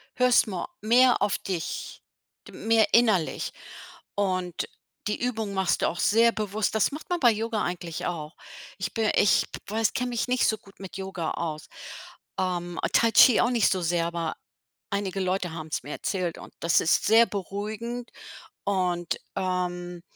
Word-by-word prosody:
hörst 250 -2 +4
ma 185 -4 -4
mehr 245 +3 +5
auf 205 0 +2
dich, 180 -4 -5 0.5
d - - -11
mehr 225 -1 +3
innerlich. 215 -9 +3 0.6
Und 185 -3 -1 0.4
die 210 - -2
Übung 220 -5 -2
machst 190 -2 +1
du - - +4
auch 175 - -6
sehr 230 +2 +4
bewusst. 215 -1 -2
Das 220 - +2
macht 300 +5 -8
man 350 - +1
bei 245 - +6
Yoga 220 0 -2
eigentlich 175 -1 -4
auch. 155 -3 -5 0.4
Ich 185 -1 -3
bi 220 -2 +2
ich 205 - +4
w - - -5 0.2
weiß 225 -1 +2
kenne 250 0 -1
mich 240 0 -1
nicht 250 0 +2
so 220 - +1
gut 195 -1 -20
mit 190 -1 -8
Yoga 190 -4 -4
aus. 155 -2 -4 0.7
Ähm, 175 -2 -2
ah, 165 - 0
Tai 230 -1 +4
Chi 230 +2 +7
auch 240 - +3
nicht 235 -4 +3
so 185 - 0
sehr, 170 0 +1
aber 170 -1 -3 0.6
einige 200 -1 -2
Leute 185 -2 -1
haben 160 -1 -7
es - - -1
mir - - -10
erzählt 180 -2 -2
und - - -12
das 165 -2 +3
ist 160 - +2
sehr 225 +2 +6
beruhigend. 215 +5 -5 0.5
Und, 180 -3 0 0.2
ähm, 180 -2 -2
195 Hz, 175 wpm, -26 LUFS, 175-225 Hz, 0.7 s, Chi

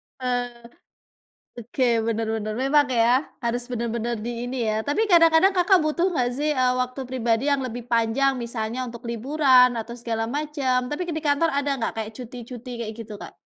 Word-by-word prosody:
Oh, 245 -2 -3 0.9
oke 240 +3 -6 0.2
bener 225 -1 -1
bener 215 -1 -3
memang 280 +3 +4
ya 245 +3 +3 0.2
harus 240 -1 -2
bener-bener 235 -1 -2
di 235 +2 -4
ini 250 +1 -4
ya 215 0 0
tapi 295 - 0
kadang-kadang 340 +1 +5
Kakak 365 +1 +4
butuh 335 +4 0
nggak 255 -7 +1
sih, 300 +3 0
eee, 255 -3 +2
waktu 255 +1 -2
pribadi 240 0 0
yang 280 -2 +1
lebih 245 -1 -6
panjang 235 +4 +2
misalnya 235 0 -4
untuk 235 -1 -8
liburan 255 +1 +4
atau 235 +1 -6
segala 230 -2 -3
macam 270 -2 -1
tapi 345 +4 -3
di 320 -2 -4
kantor 290 +2 +2
ada 280 -1 0
nggak 230 - -2
kayak 220 -1 -4
cuti-cuti 245 +1 -9
kayak 215 - -5
gitu 215 -2 -7
Kak? - - -10
250 Hz, 175 wpm, -24 LUFS, 235-285 Hz, 0.9 s, kadang-kadang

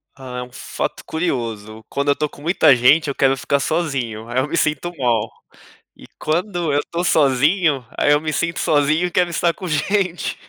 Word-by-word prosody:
Ah, 130 -2 -7
é - - -4
um 125 - -13
fato - - -5
curioso, 115 -9 -3
quando 140 +1 -1
eu 140 - +4
tô 150 - -1
com 145 - -16
muita 155 -3 +4
gente 145 +6 +4
eu 140 - -3
quero 135 0 +2
ficar 140 +2 0
sozinho, 135 -8 -2
aí 120 +2 -1
eu 130 - 0
me 170 - -2
sinto 155 +2 0
mal, 115 -4 +1 0.7
e - - -14
quando 175 0 -1
eu 145 - +2
estou 170 +3 -4
sozinho, 150 -1 +2
aí 145 - +4
eu 145 - +4
me 155 0 -3
sinto 170 +2 -1
sozinho 155 +3 +2
e - - -4
quero 175 0 +1
estar 170 0 +1
com 185 - -8
gente. 180 +3 -1
145 Hz, 200 wpm, -20 LUFS, 130-170 Hz, 0.7 s, eu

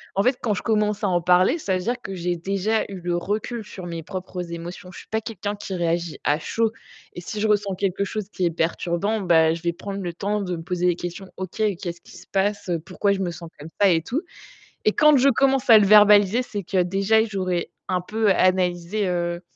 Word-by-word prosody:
En 195 - +2
fait, 250 +2 +2
quand 215 -3 0
je - - -5
commence 210 -1 0
à 205 - +3
en 175 -2 +1
parler, 180 - +3
ça 190 -10 -1
veut 180 - -5
dire 240 +3 -2
que 195 - -6
j'ai 175 0 -1
déjà 195 +5 0
eu 195 - -7
le 175 0 -2
recul 215 +6 -3
sur 190 -3 -9
mes 170 -1 -5
propres 180 0 -6
émotions. 175 +2 -7
Je - - -12
suis - - -14
pas 220 0 -1
quelqu'un 205 -1 -4
qui 200 -2 -6
réagit 170 -1 -1
à 150 +1 +2
chaud 225 +6 0 0.4
et 175 - -7
si 210 +4 -6
je 215 - +1
ressens 205 -2 +1
quelque 195 +1 -1
chose 210 0 -4
qui 185 - -3
est - - +3
perturbant, 175 +5 -1
bah 160 -3 +4
je 165 - -6
vais 170 0 0
prendre 200 +3 -6
le 175 -2 -3
temps 205 +3 -2
de 180 -2 -3
me 165 - -8
poser 180 0 -1
des 175 - +2
questions: 175 +2 -6
«OK, 190 +3 -5 0.2
qu'est-ce 170 -2 -5
qui - - -15
se 175 - -14
passe? 200 -1 -1 0.2
Pourquoi 200 +2 +1
je 195 - -3
me 185 -2 -1
sens 170 +1 -9
comme 150 +2 -9
ça?», 200 - +6
et 165 - +2
tout? 250 - -2 0.6
Et 215 - +5
quand 300 -1 +5
je 270 +2 +5
commence 270 0 +2
à 220 - +10
le 205 - +4
verbaliser, 210 +2 +6
c'est 205 -5 -5
que 185 +1 +1
déjà, 195 +5 +2
j'aurais 185 -5 -2 0.2
un 180 -1 0
peu 215 +3 0
analysé, 185 +1 +1
heu, 175 -1 -2
190 Hz, 235 wpm, -23 LUFS, 175-210 Hz, 0.6 s, à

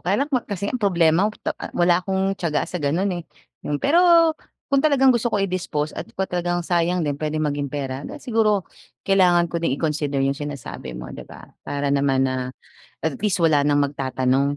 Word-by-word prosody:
Kaya 200 +10 +1
lang, 295 - -16
mak 250 -2 0
kasi 200 0 -3
ang 250 - -3
problema, 175 -1 +3
put 215 - -12
ah, - - -8
wala 175 0 +4
akong 190 +1 0
tiyaga 170 -6 -1
sa 180 - -5
gano'n, 170 +7 0
eh. 175 - -4 0.5
Pero, 335 - +5 0.4
kung 275 - +5
talagang 270 -3 +4
gusto 240 0 0
ko 225 - -1
i-dispose 180 -6 -2
at - - -7
kung 190 - 0
talagang 175 -1 -2
sayang 175 0 +1
din, 145 -1 -3
puwedeng 155 0 -1
maging 145 -1 -1
pera, 135 -1 -4
then - - -8
siguro 220 -8 +1 0.4
kailangan 180 -3 +3
ko 170 - -1
din 150 -5 0
i-consider 145 -2 -1
'yong 135 - +2
sinasabi 140 - -6
mo, - - -7
'di - - -8
ba. - - -12 0.2
Para 145 0 -2
naman 140 -1 +2
na, 130 - 0 0.7
at 160 -4 -1
least, 205 -3 +1
wala 155 -3 +4
nang 145 0 +3
magtatanong 135 0 0
170 Hz, 195 wpm, -22 LUFS, 145-200 Hz, 0.7 s, Pero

